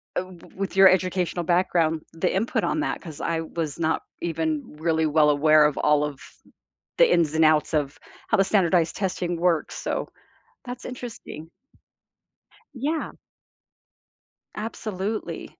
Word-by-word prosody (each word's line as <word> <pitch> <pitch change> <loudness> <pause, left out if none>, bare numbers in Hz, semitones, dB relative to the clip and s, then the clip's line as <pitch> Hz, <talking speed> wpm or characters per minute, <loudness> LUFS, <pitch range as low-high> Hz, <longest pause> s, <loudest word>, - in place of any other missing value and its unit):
uh, - - +1
w 185 -2 -14
with 195 0 -4
your 190 0 +9
educational 185 -1 0
background, 170 -2 +1
the 165 +2 -1
input 210 +5 0
on - - 0
that - - -2
'cause 160 -5 -9
I 165 -1 -1
was 160 -3 -4
not 160 0 0 0.2
even 160 -3 -2
really 160 -1 +1
well 150 0 +4
aware 155 +1 +5
of 150 - 0
all 150 0 +3
of 145 -2 -6 0.8
the - - +6
ins 160 -3 +2
and 160 - +4
outs 155 0 +3
of 145 -2 -1 0.3
how - - +3
the 195 - +4
standardized 175 -4 +2
testing 180 -3 -2
works, 170 -3 +1
so - - -3 0.6
that's 245 -1 -7
interesting. 240 -10 -8 1.3
Yeah. 295 +5 -2 1.4
Absolutely. 215 -1 -4
170 Hz, 140 wpm, -24 LUFS, 155-190 Hz, 1.4 s, your